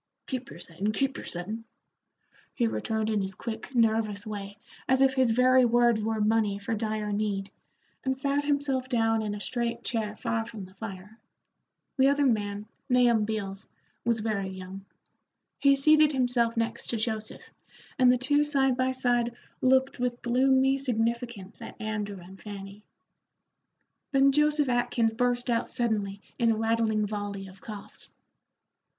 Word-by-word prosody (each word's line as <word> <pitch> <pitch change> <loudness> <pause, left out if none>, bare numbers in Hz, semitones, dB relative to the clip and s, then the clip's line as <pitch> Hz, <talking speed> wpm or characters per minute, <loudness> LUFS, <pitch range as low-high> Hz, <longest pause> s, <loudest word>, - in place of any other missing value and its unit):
"Keep 260 0 -4
your - - -10
settin', 180 +4 -3
keep 270 +3 0
your - - -7
settin'," 210 +6 -5 0.9
he 240 - +2
returned 220 -1 -1
in 210 -2 +1
his 190 0 -4
quick, 235 +5 -6
nervous 220 -3 +2
way, 200 -1 -6 0.3
as 260 0 +4
if 270 0 +4
his 260 -2 +3
very 255 +2 +5
words 240 -2 +4
were 220 0 -1
money 210 -1 +2
for 205 +3 -4
dire 215 -1 -2
need, 205 -1 -2 0.5
and 265 0 0
sat 280 +1 0
himself 280 -3 0
down 225 -2 +2
in 210 -1 -3
a - - -6
straight 235 +2 -2
chair 215 -3 -2
far 225 +1 -1
from 220 -4 -8
the 185 - -16
fire. 205 +1 -9 0.8
The 265 - +6
other 285 +1 +3
man, 205 -4 0 0.2
Nahum 240 -3 +4
Beals, 200 -3 -4 0.4
was 235 -2 +1
very 205 -3 -1
young. 190 +1 -8 0.7
He 280 0 +5
seated 305 +2 +5
himself 245 -3 +1
next 230 0 -2
to 235 - -2
Joseph, 220 -1 -4 0.5
and 250 -1 +7
the 250 - +3
two 290 +4 +2
side 270 -3 +2
by 255 +1 +1
side 240 -2 0 0.3
looked 260 0 +3
with 245 -1 -2
gloomy 265 +2 +3
significance 235 -4 -2
at - - -9
Andrew 210 -2 -3
and 185 +2 -13
Fanny. 200 0 -9 1.3
Then 275 0 +5
Joseph 300 0 +3
Atkins 240 -2 +1
burst 245 +1 0
out 235 -2 0
suddenly 210 -4 -1 0.2
in 235 -1 +3
a - - +1
rattling 225 -1 +1
volley 205 -1 -4
of 190 0 -15
coughs. 210 -2 -9
230 Hz, 155 wpm, -28 LUFS, 210-255 Hz, 1.3 s, and